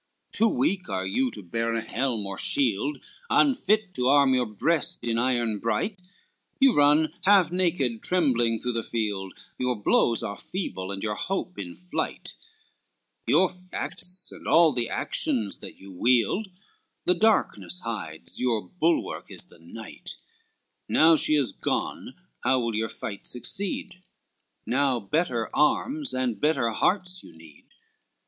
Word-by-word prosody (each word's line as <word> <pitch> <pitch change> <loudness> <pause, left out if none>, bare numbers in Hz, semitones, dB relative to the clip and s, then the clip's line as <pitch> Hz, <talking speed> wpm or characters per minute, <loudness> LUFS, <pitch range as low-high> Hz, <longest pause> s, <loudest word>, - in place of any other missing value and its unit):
LXXVII - - -5
"Too 225 - +6
weak 195 - 0
are 95 -1 -2
you 125 +7 +1
to 105 -3 -9
bear 115 +6 -1
a 115 - 0
helm 115 -2 -2
or 100 0 -4
shield 135 +5 +1 0.3
Unfit 215 - +3
to 125 -6 0
arm 140 -1 +5
your 125 -2 +2
breast 160 - 0
in 115 0 +1
iron 120 -4 0
bright, 115 - -1 0.6
You 270 -2 +6
run 150 +2 +4
half 195 -4 +5
naked 165 -11 0
trembling 125 -10 +2
through 125 +3 -3
the 115 -1 -1
field, 105 -5 -3 0.2
Your 125 -1 +1
blows 115 +2 +2
are 100 - -4
feeble, 100 - -5
and 100 -1 -5
your 105 -1 -1
hope 180 - -3
in 90 -3 -6
flight, 90 0 -4 0.9
Your 160 +10 +5
facts 180 0 -3
and - - -10
all 165 -1 +6
the 120 -3 -2
actions 105 -4 -1
that - - -9
you 95 0 -12
wield, 120 - +2 0.6
The 180 - +5
darkness 205 -2 +1
hides, 105 -9 -5
your 120 -4 0
bulwark 170 -2 0
is - - -6
the - - -15
night, 105 +7 -9 0.7
Now 160 +1 +6
she 155 0 +2
is 135 -8 +2
gone, - - -3 0.3
how 130 - +3
will 115 -1 -1
your 110 +1 -1
fights 100 -2 -6
succeed? 185 +7 -2 0.6
Now 130 -1 +1
better 120 - -1
arms 275 - +2
and 130 -3 -1
better 150 -7 +2
hearts 180 - 0
you - - -14
need." 80 -3 -16
125 Hz, 150 wpm, -26 LUFS, 110-175 Hz, 0.9 s, Too